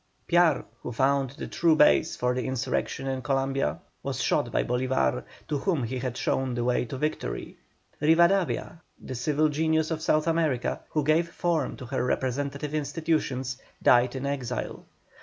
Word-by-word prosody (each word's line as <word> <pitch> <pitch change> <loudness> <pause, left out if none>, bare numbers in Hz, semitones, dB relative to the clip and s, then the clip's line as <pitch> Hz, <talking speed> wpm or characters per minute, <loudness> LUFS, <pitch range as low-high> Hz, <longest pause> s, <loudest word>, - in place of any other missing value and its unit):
Piar, 170 -4 +4 0.2
who - - -5
found 135 +2 +2
the - - -5
true 165 -2 +2
base 155 +1 +4
for 125 0 0
the 125 0 -2
insurrection 130 +1 -2
in 135 -1 -2
Columbia, 135 - 0 0.2
was - - -3
shot - - +1
by - - +1
Bolívar, 125 - 0 0.2
to 145 - -1
whom 165 -5 0
he 125 +2 -3
had 125 -1 -3
shown 130 -2 0
the 120 - -1
way 125 0 +1
to 130 +3 -6
victory. 140 - -3 0.4
Rivadavia, 170 +1 +3 0.2
the - - -7
civil 150 +5 +1
genius 160 +1 +1
of 160 -1 -2
South 155 -1 +2
America, 160 -7 0
who 150 - 0
gave 160 +3 +2
form 170 -4 -1
to 125 - -8
her 130 +2 -2
representative 140 +3 -2
institutions, 145 -4 -1 0.2
died 125 +1 +5
in 130 +1 -3
exile. 130 -3 -3
140 Hz, 160 wpm, -27 LUFS, 125-155 Hz, 0.4 s, died